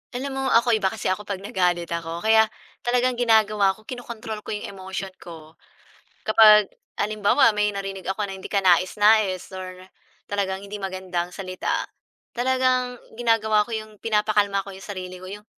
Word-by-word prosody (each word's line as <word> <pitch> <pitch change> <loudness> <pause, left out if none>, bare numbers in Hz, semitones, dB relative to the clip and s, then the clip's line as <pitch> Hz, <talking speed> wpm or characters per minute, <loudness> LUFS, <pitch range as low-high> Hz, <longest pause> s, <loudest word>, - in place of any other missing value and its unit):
Alam 270 +1 -3
mo 270 - -2
ako, 235 -1 +4
iba 215 -4 +2
kasi 185 - -2
ako 200 +2 -4
'pag 195 -1 -4
nagalit 175 -4 0
ako. 170 +1 -4
Kaya 220 0 +5 0.3
talagang 245 0 0
ginagawa 215 -4 +3
ko, 215 - -20
kino-control 225 -2 -7
ko - - -12
'yong 210 - -6
emotion 190 0 -6
ko. 160 -2 -12 0.6
Kapag 215 -2 +6 0.3
halimbawa 215 +5 +3
may 210 0 +1
narinig 195 -1 -5
ako 190 +3 -2
na 195 - -6
hindi 190 - -12
kanais-nais 195 +1 +3
or 185 0 -8 0.5
talagang 195 -1 -2
hindi 200 +1 -7
magandang 185 -2 -4
salita, 185 -1 -3 0.5
talagang 255 -1 +1 0.2
ginagawa 220 -3 +2
ko 235 - -7
'yong 215 -1 -6
pinapakalma 210 -2 +1
ko 195 - -11
'yong 195 - -11
sarili 185 -2 -7
ko, 185 - -11
'yong 205 +3 -9
205 Hz, 160 wpm, -24 LUFS, 190-220 Hz, 0.6 s, Kapag